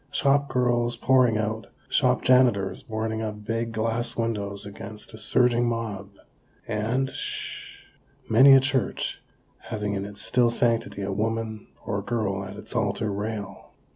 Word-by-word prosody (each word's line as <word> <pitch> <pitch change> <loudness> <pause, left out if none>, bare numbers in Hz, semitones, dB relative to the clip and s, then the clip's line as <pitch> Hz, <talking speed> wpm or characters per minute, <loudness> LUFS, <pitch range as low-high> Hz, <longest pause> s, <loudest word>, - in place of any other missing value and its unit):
Shop 140 0 +2
girls 120 -2 +1
pouring 125 -2 +4
out! 110 +1 -2 0.2
Shop - - +2
janitors 120 -7 +3
boarding 110 0 -3
up 105 -1 -5
big 115 +1 -2
glass 115 +2 -2
windows 105 -4 -2
against 100 +2 -9
a - - -9
surging 120 +2 +3
mob! 110 -4 -4 0.6
And, 115 +5 -1
(sh - - -6
h - - -26 0.4
h - - -34
h) - - -12
many 135 +5 +8
a 135 - +9
church 130 -1 -1 0.4
having 105 -2 -4
in 100 -1 -2
its 100 0 -7
still 120 -2 +3
sanctity 115 -4 0
a 100 - -2
woman 110 +1 -2 0.2
or 100 - -1
girl 100 -3 -2
at 95 - -8
its - - -10
altar 105 -1 0
rail. 105 0 -5
110 Hz, 155 wpm, -26 LUFS, 105-120 Hz, 0.6 s, a